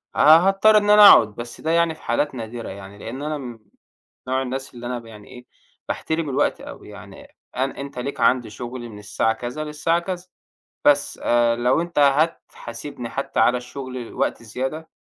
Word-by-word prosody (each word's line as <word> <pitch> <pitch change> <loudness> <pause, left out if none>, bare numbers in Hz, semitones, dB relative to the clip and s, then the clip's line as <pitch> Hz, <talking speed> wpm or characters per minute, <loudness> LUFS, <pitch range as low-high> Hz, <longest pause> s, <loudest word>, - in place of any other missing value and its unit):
ه - - -4
هاضطر 195 +7 +6
إن 205 0 +1
أنا 210 -1 +10
أقعد، 105 -2 +6
بس 120 0 -8
ده 160 - -1
يعني 170 -1 +2
في - - -20
حالات 135 +4 -1
نادرة 115 0 -6
يعني، 100 +1 -10
لأن 120 +6 -7
أنا 140 -6 -5 0.7
نوع 130 +1 0
الناس 130 +1 -5
اللي 120 0 -10
أنا 120 0 -3
ب 115 - -16
يعني 105 -2 -13
إيه، 125 0 -13 0.4
باحترم 160 -2 -2
الوقت 140 +2 0
أوي - - -11
يعني، - - -13 0.2
أنا 135 +2 -2
أنت 140 -2 -7
ليك 140 +3 -5
عندي 120 0 +2
شغل 120 +2 -7
من 105 -2 -11
الساعة 105 +2 0
كذا 125 +7 -5
للساعة 155 +3 0
كذا، 180 0 -6 0.6
بس 145 0 +2
آآ، 120 -1 +2
لو 125 +6 +2
أنت 170 -3 -4
هتحاسبني 140 -4 -1
حتى 135 +4 -3
على 125 - +4
الشغل 125 -1 -8
وقت - - -1
زيادة 135 +8 -5
130 Hz, 180 wpm, -22 LUFS, 120-155 Hz, 0.7 s, أنا